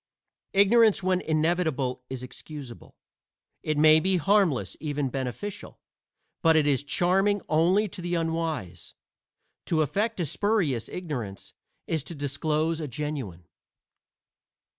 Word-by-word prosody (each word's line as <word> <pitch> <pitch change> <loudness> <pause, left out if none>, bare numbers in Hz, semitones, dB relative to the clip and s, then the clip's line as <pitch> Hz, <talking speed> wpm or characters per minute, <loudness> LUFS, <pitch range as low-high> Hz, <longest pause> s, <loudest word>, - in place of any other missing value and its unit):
Ignorance 205 0 +5
when 185 0 +1
inevitable 155 -5 0
is 130 -1 -5
excusable. 130 -1 -10 0.7
It 155 -1 -1
may 155 +1 +7
be 185 +3 +1
harmless, 165 - +2
even 145 -3 -2
beneficial; 135 - -5 0.6
but 165 -1 +5
it 155 -2 +4
is 140 -3 +2
charming 195 +6 +1
only 180 +7 +3
to 180 - -8
the 175 0 -2
unwise. 165 - -3 0.7
To 155 -2 +2
affect 210 - -1
a 175 - 0
spurious 165 - 0
ignorance 125 - -6 0.3
is 160 -4 -1
to 170 - -6
disclose 155 +3 -1
a 150 - -3
genuine. 130 - -5
155 Hz, 120 wpm, -27 LUFS, 140-180 Hz, 0.7 s, may